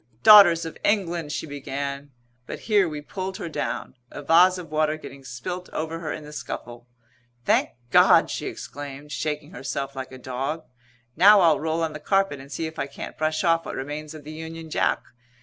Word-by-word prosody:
"Daughters 175 -6 +9
of 165 - -8
England!" 175 -7 0
she - - -3
began, 140 -1 -5 0.4
but - - -7
here 205 -5 +3
we 150 -1 -6
pulled 190 +5 -5
her - - -5
down, 160 - -4 0.2
a 145 - -8
vase 180 +5 +5
of 170 -4 -9
water 155 0 +1
getting 140 -3 -11
spilt 135 +9 -6
over 160 +1 -3
her 160 -2 -4
in - - -6
the 150 0 -11
scuffle. 120 -4 -7 0.6
"Thank - - +3 0.2
God!" - - +6
she - - -3
exclaimed, 145 +1 -8
shaking 150 +4 -3
herself 135 -4 -4
like 130 -1 -6
a 130 - -9
dog. 130 +5 -4 0.5
"Now 205 +2 +7
I'll 165 -3 +4
roll 160 +1 -1
on 160 -1 -2
the 150 - -7
carpet 195 -3 +1
and 135 +1 -12
see 165 - -3
if 160 0 -7
I 140 - -1
can't 140 - -8
brush 155 +2 -1
off 165 -1 +3
what - - -5
remains 150 +3 -6
of 155 - -10
the 150 - -9
Union 160 0 -8
Jack. - - +1
155 Hz, 195 wpm, -25 LUFS, 140-165 Hz, 0.6 s, Daughters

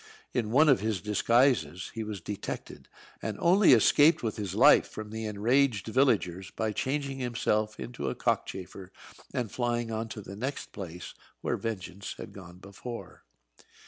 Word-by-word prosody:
In 115 -4 0
one 145 +7 +5
of 135 - +5
his 105 -1 -1
disguises 105 - +2
he 115 - -4
was 105 -3 -6
detected, 100 +3 -6 0.3
and 110 -2 -3
only 185 +2 +5
escaped 145 +7 +5
with 110 -2 -1
his 100 -4 -4
life - - +6
from 110 -1 -8
the 110 0 -4
enraged 115 +2 +2
villagers 105 -7 +1
by 110 -1 -2
changing 135 +4 -2
himself 110 -3 -1
into 125 - -4
a - - -4
cockchafer 95 0 -3 0.4
and 120 -5 -3
flying 120 -2 -1
on 110 +1 -2
to 110 - -7
the 100 - -9
next 130 +7 -4
place, 90 -3 -8 0.3
where - - 0
Vengeance 100 -3 -5
had - - -9
gone 90 -3 -11
before. 100 +5 -9
110 Hz, 155 wpm, -29 LUFS, 100-125 Hz, 0.4 s, life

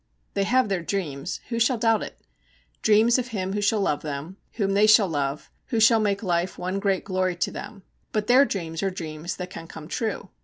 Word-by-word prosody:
They 200 - +1
have 255 +3 +3
their 195 -3 -1
dreams 165 -3 -3
who 230 -1 -1
shall 235 +2 +3
doubt 225 -1 +2
it? - - -8 0.6
dreams 220 +3 +4
of 250 - -3
him 195 -5 -3
who 205 - -1
shall 205 +1 +2
love 150 -7 0
them, 150 +5 -6 0.2
whom 195 -3 0
they 205 +2 +5
shall 215 -2 +6
love, 145 -3 -3 0.2
who 230 - 0
shall 225 +1 +6
make 205 -1 0
life 175 -1 0
one 185 +2 -2
great 195 -2 0
glory 185 -2 0
to 175 - -1
them; 195 - -8 0.3
but 215 -1 -1
their 250 +5 +6
dreams 165 - -3
are 195 - +1
dreams 165 -2 -5
that 180 0 -7
can 165 -3 -8
come 155 -1 -10
true. 210 -2 -3
195 Hz, 215 wpm, -25 LUFS, 175-215 Hz, 0.6 s, shall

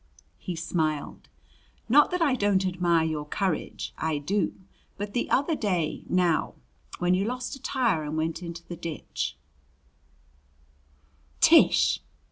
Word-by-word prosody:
he 180 - -5
smiled. 160 -2 -2 0.6
"Not 290 +5 +6
that 360 -1 0
I 285 -5 +3
don't 200 -5 +2
admire 175 -3 +2
your 155 -2 -2
courage. 185 0 -2
I 160 -1 0
do. 195 +8 -1 0.4
But 205 0 -5
the 245 - -1
other 285 +4 +2
day, 180 - -1
now, 180 -3 +1 0.4
when 180 +1 +2
you 185 +2 +2
lost 250 +4 -3
a 270 - -14
tire 235 - +1
and 150 +1 -4
went 160 +2 -2
into 170 -1 -7
the 175 - -6
ditch 165 -2 -5 1.0
" 70 +1 -36
"Tish!" - - +5
170 Hz, 135 wpm, -27 LUFS, 150-205 Hz, 1.0 s, Not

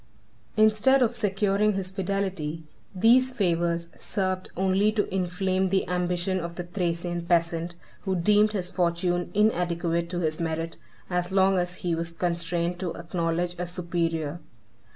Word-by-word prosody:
] - - -34
Instead 220 +5 +5
of 240 0 0
securing 205 -1 +1
his 190 -1 -3
fidelity, 190 -5 -2 0.3
these 240 +6 +5
favors 170 -6 0
served 185 -2 -2
only 190 +3 +3
to 215 -2 0
inflame 185 +1 0
the 190 +1 +1
ambition 180 +1 0
of 170 0 -5
the 175 - -4
Thracian 175 -1 -2
peasant, 170 0 +1 0.3
who 190 -1 0
deemed 210 +4 +4
his 185 -3 -2
fortune 175 0 0
inadequate 170 -5 +1
to 180 - -3
his 155 -3 -1
merit, 165 0 -3 0.3
as 180 0 -1
long 190 0 +4
as 180 0 -2
he 175 - +1
was 165 +1 -3
constrained 170 0 -1
to 180 -3 -3
acknowledge 170 0 -2
a 180 - -2
superior. 170 -3 -2
180 Hz, 145 wpm, -26 LUFS, 170-195 Hz, 0.3 s, Instead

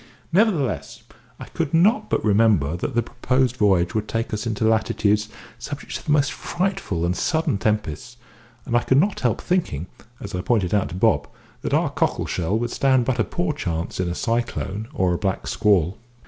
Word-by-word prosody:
Nevertheless, 175 - +1 0.4
I - - -7
could 145 - -2
not 205 +10 +3
but - - 0
remember 100 -8 +3
that 90 - -4
the 120 - +2
proposed 125 +1 0
voyage 95 -4 +3
would 110 -1 -1
take 115 -1 -2
us 105 +2 -2
into 110 -1 -1
latitudes 105 -1 +2 0.3
subject 145 +3 -7
to - - -5
the 150 - -2
most 145 -2 +3
frightful 170 - -2
and 90 +1 0
sudden 160 - 0
tempests, 105 +2 -2 0.5
and 120 - -1
I 120 - +4
could 130 - +2
not 195 +7 +2
help 120 -3 0
thinking 165 - -1 0.3
(as 100 +1 -8
I 90 - -2
pointed 95 -4 +1
out 100 -1 +1
to - - -7
Bob) 95 - +2 0.3
that - - 0
our - - +1
cockle - - 0
shell 90 +5 -1
would 120 +1 -2
stand 130 -3 +2
but 125 -1 -1
a - - +4
poor 175 +3 -2
chance 85 - -3
in 90 -1 0
a 85 - -3
cyclone 115 -3 -2
or 95 - +1
a 85 - -2
black 95 -2 -2
squall. 95 -2 +2
110 Hz, 190 wpm, -23 LUFS, 95-130 Hz, 0.5 s, I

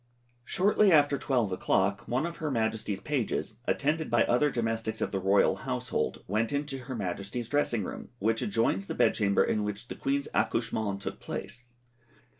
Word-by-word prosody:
Shortly 200 +5 +3
after 145 -3 +5
12 120 -8 +1
o'clock 95 +2 +1
one 130 +6 0
of 170 0 -5
her 155 - -2
Majesty's 110 -4 -1
pages, 125 -6 -2
attended 155 +2 0
by 120 0 +4
other 135 +5 +3
domestics 115 -3 -2
of - - -1
the 95 - -1
royal 95 +1 +3
household, - - -2
went 110 +5 0
into 140 -1 -2
her 130 - -5
Majesty's 100 +3 -4
dressing 125 -6 +1
room, - - -7
which 115 +1 +1
adjoins 100 -2 0
the - - -4
bed - - +4
chamber 100 -2 +3
in 105 - 0
which 105 +3 -5
the - - -5
Queen's 140 +1 -1
accouchement 110 -4 0
took - - -5
place. 120 +3 -7
115 Hz, 170 wpm, -29 LUFS, 105-140 Hz, -, after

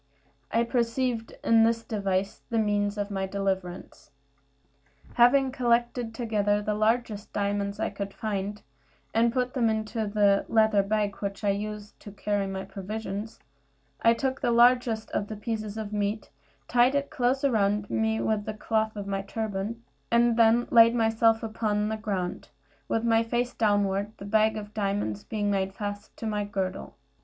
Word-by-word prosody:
I 230 - +3
perceived 235 -1 -1
in 225 -1 +5
this 230 0 +2
device 195 -3 -2
the 230 - -1
means 205 -1 +1
of 205 0 -3
my 190 -1 -2
deliverance. 190 -4 -4 1.0
Having 260 +2 +5
collected 240 -2 0
together 210 -3 +1
the 210 0 -1
largest 215 0 0
diamonds 200 0 -1
I - - -1
could 200 0 -5
find, 205 -1 -4 0.5
and 230 +1 +3
put 250 0 -1
them 235 -4 +2
into 220 0 -2
the 205 -1 +3
leather 220 -2 +4
bag 205 +1 0
in - - -18
which 200 +1 -4
I 205 - +3
used 210 +1 -5
to 205 - -10
carry 205 0 -1
my 190 0 -4
provisions, 210 +2 -6 0.6
I 230 0 +5
took 265 +2 -2
the - - +1
largest 240 -1 +3
of 205 - -1
the 215 - -6
pieces 215 -1 -4
of 215 -1 -5
meat, 205 -2 -2 0.4
tied 245 +3 +4
it 280 0 -1
close 265 -2 0
round 205 -5 +1
me 220 0 +1
with 215 -2 0
the 215 - -4
cloth 220 0 -1
of 205 -1 -5
my 195 0 -2
turban, 215 +2 -4 0.3
and 235 0 +4
then 230 +1 +4
laid 230 0 +7
myself 225 0 +3
upon 215 -1 -1
the 220 - -1
ground, 195 -5 -3 0.4
with 225 - 0
my 225 -1 +3
face 240 +2 -1
downward, 205 -1 +1
the 200 - -9
bag 220 +1 +2
of 210 0 -8
diamonds 195 - -2
being 205 -2 -2
made 195 -1 -1
fast 205 0 -6
to - - -6
my 210 -1 -1
girdle. 195 -2 -4
215 Hz, 165 wpm, -27 LUFS, 205-230 Hz, 1.0 s, laid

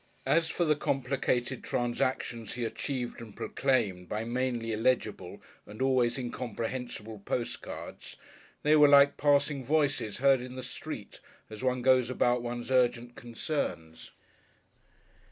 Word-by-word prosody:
As 165 0 +2
for 175 - 0
the 155 -1 +3
complicated 130 -2 -1
transactions 120 -2 -2
he 120 -1 -2
achieved 125 0 -4
and 110 -3 -11
proclaimed 105 -10 0
by 105 +1 -2
mainly 120 -1 -1
illegible 115 +3 -1 0.2
and 105 +1 -11
always 130 -2 +2
incomprehensible 120 -3 -5
postcards, 115 +4 -5 0.5
they 150 +1 +5
were 150 -1 +7
like 140 0 +7
passing 145 -1 +2
voices 145 -6 +1
heard 135 -1 +4
in 125 0 -8
the 130 - -6
street 125 - -7 0.3
as 110 +3 -8
one 125 -1 0
goes 130 -1 +4
about 125 -1 +2
one's 120 +1 -5
urgent 120 -1 +2
concerns. 120 - -4
125 Hz, 125 wpm, -30 LUFS, 120-135 Hz, 0.5 s, were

